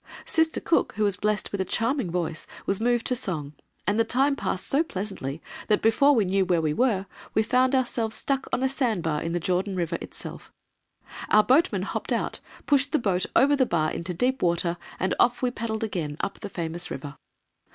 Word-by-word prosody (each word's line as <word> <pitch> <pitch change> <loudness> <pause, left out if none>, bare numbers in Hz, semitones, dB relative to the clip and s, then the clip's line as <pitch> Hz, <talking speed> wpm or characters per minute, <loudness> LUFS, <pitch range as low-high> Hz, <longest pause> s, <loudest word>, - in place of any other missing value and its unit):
Sister 320 0 +2
Cook, 335 - +1
who 215 - -1
was 200 -2 +3
blessed 210 +1 -1
with 200 - -1
a - - +2
charming 230 +3 0
voice, 165 -2 -2 0.2
was 195 - +1
moved 240 0 +2
to 250 - +2
song, 155 - -3 0.3
and 205 +3 +1
the - - +5
time 275 +5 +2
passed 185 - -3
so 280 - +2
pleasantly 190 - -5 0.2
that 210 - +2
before 275 +6 +5
we 220 -4 +3
knew 190 +1 +2
where 175 -2 +2
we 155 -2 0
were, 215 -3 +1 0.3
we 220 - +4
found 255 +4 +3
ourselves 235 -4 0
stuck 270 -1 -1
on 255 - 0
a - - +4
sandbar 215 - 0
in 165 +1 -3
the 175 - 0
Jordan 185 +3 -1
River 170 -3 -1
itself. - - -8 0.8
Our 215 0 +6
boatmen 300 - +3
hopped - - -4
out, - - -1 0.3
pushed 285 0 +2
the - - +5
boat 190 -8 0
over 280 +4 +5
the 260 -3 +2
bar 155 -2 +1
into 170 +2 -4
deep 250 +9 0
water, 170 0 +1 0.2
and 190 - +1
off 245 +1 +3
we 250 - +2
paddled 225 -2 -3
again 165 -9 -3
up 200 - -3
the 205 - -6
famous 170 -1 -4
river. 145 -1 -6
210 Hz, 205 wpm, -26 LUFS, 175-255 Hz, 0.8 s, Our